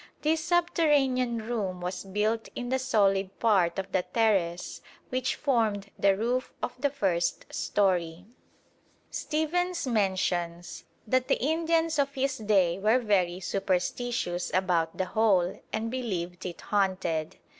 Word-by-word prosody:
This 315 +1 +1
subterranean 285 -9 +2
room 200 -6 -2
was 180 +2 -4
built 210 +3 -1
in 245 -1 -4
the 260 +1 +1
solid 195 -6 +1
part 190 -7 +2
of 195 - -4
the 185 - +2
terrace 190 -5 0 0.3
which 255 0 -1
formed 220 -8 0
the 195 -1 +4
roof 245 +4 -1
of 250 - -2
the 285 - +3
first 190 -11 -1
storey. 180 -3 0 0.9
Stephens 340 +3 -1
mentions 185 -6 -1 0.2
that 255 +3 +1
the - - +2
Indians 325 +2 +1
of 280 0 0
his 270 -1 -1
day 195 -5 +2
were 215 +5 +4
very 190 -7 +1
superstitious 190 +1 -1
about 175 -3 +1
the 185 - 0
hole 190 -2 +2
and 225 +1 -2
believed 185 -9 -3
it 175 - -8
haunted. 185 -6 -1
210 Hz, 130 wpm, -28 LUFS, 185-255 Hz, 0.9 s, the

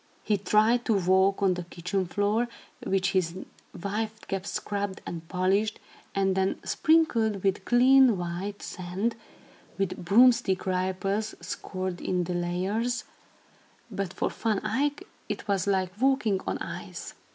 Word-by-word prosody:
He 210 - +2
tried 215 +4 +3
to 225 - +2
walk 190 +1 +3
on 190 -2 +4
the 180 - -4
kitchen 180 +2 -2
floor, 205 +6 +1 0.4
which 190 0 +1
his 180 -2 0 0.4
wife 215 +3 -3
kept 195 0 -3
scrubbed 200 -2 -3
and 165 -1 -6
polished, 195 +4 +1 0.4
and 195 -1 +2
then 190 0 0
sprinkled 230 - +2
with 195 0 0
clean 255 -2 +6
white 180 +4 -4
sand, 190 +5 -3 0.6
with 185 -2 -2
broomstick 230 0 +4
ripples 190 +3 -1
scored 185 -2 -5
in 180 -1 0
the 180 - -3
layers, 195 +7 -1 0.9
but 195 -2 -3
for - - -2
Van 215 -3 0
Eyck 290 +8 0 0.3
it - - -4
was 200 -1 0
like 190 -2 +1
walking 260 -8 +2
on - - -1
ice. - - -7
195 Hz, 135 wpm, -27 LUFS, 185-220 Hz, 0.9 s, clean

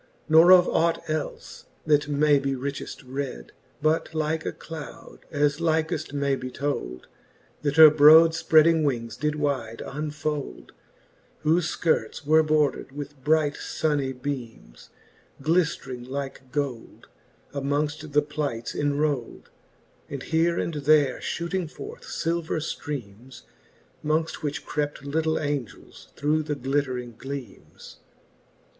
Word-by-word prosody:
Nor 160 +3 +7
of 180 -1 +8
ought 165 0 +1
elfe, 155 -1 -5 0.2
that 150 -1 +3
may 145 0 +3
be 135 0 -1
richeft 140 +2 -5
red, 130 - -5 0.3
But 155 +1 +1
like 155 +1 -1
a - - -1
cloud, 160 -3 -10
as 145 -1 +1
likeft 160 -1 0
may 140 -1 0
be 130 -1 -6
told, 125 - -4 0.6
That 145 +1 -1
her 155 -1 +11
brode 155 +2 +8
fpreading 160 0 +4
wings 120 -5 -1
did 150 0 -1
wyde 135 -7 -2
unfold; 150 - -4 0.7
Whofe 160 +1 +2
Ikirts 160 -2 0
were 155 +2 +5
bordred 155 -3 +1
with 145 -1 -8
bright 150 -1 +2
funny 145 -4 -1
beams, 125 - -7 0.5
Gliftring 140 -5 -1
like 135 -1 -6
gold, 135 -5 -4 0.5
amongft 145 +2 -2
the 145 0 +3
plights 145 -6 -4
cnrold, 145 -3 -1 0.6
And 140 -2 -6
here 170 +1 +1
and 170 - -2
there 145 -2 +3
fhooting 170 0 -3
forth - - -9
filver 165 0 -2
flreames, 130 -6 -6 0.6
Mongft. 155 +2 -1
which 150 -2 -4
crept 145 -1 -3
litle 160 +2 0
Angels 145 -7 -5
through 150 +2 +1
the 150 -1 -3
glittering 130 -3 -2
gleames. 135 -3 -9
145 Hz, 120 wpm, -25 LUFS, 135-155 Hz, 0.7 s, her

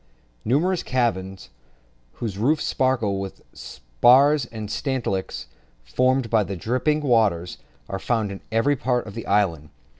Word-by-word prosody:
Numerous 165 - +1
caverns, 95 - -2 0.6
whose 110 -5 -5
roofs 150 +7 +2
sparkle 120 -7 0
with 95 -1 -6
the - - -26
spars 120 - +3
and 110 -3 -7
stalactites 120 -9 -3 0.4
formed 130 - +1
by 110 -1 +3
the 100 0 -5
dripping 130 - 0
water, 110 - +2 0.4
are 95 - -4
found 110 -1 -1
in 100 - -8
every 115 +6 +2
part 125 -1 -1
of 105 - -9
the 115 - -7
islands. 85 -7 +1
115 Hz, 140 wpm, -23 LUFS, 95-130 Hz, 0.6 s, spars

